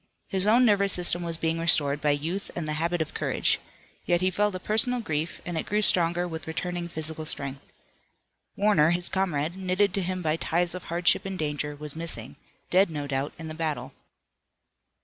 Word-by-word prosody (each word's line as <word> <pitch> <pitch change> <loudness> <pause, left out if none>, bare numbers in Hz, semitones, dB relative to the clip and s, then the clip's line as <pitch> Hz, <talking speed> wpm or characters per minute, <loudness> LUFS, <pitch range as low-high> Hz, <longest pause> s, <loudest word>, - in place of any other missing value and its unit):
His 190 0 -1
own 240 +4 +6
nervous 200 -3 +3
system 175 0 +3
was 170 -1 -3
being 165 0 0
restored 145 -3 +2
by 150 - +2
youth 160 +7 -1
and 170 -3 -3
the 155 - -1
habit 170 0 +1
of 155 - -14
courage. - - +1 0.4
Yet 175 0 +2
he 185 +1 +1
felt 205 0 +1
a - - -3
personal 225 +6 +2
grief, 160 -6 -3
and 175 -2 -2
it - - -5
grew 210 +1 +1
stronger 175 -1 +4
with 160 -2 -7
returning 175 +2 -3
physical 160 -1 -4
strength. 140 -3 -3 0.8
Warner, 200 -7 +4
his 175 +1 +2
comrade, 170 -4 -1
knitted 190 +1 +1
to 200 - 0
him 185 0 -2
by 155 0 +1
ties 170 +1 0
of 180 - -7
hardship 170 +1 +2
and 195 -1 -4
danger, 150 -1 -2
was 150 0 -7
missing, 165 +1 -4 0.4
dead 190 +1 +5
no 150 -3 -4
doubt 140 +1 -2
in 165 -1 -7
the 155 - -5
battle. 150 -5 -3
170 Hz, 190 wpm, -27 LUFS, 155-185 Hz, 0.8 s, own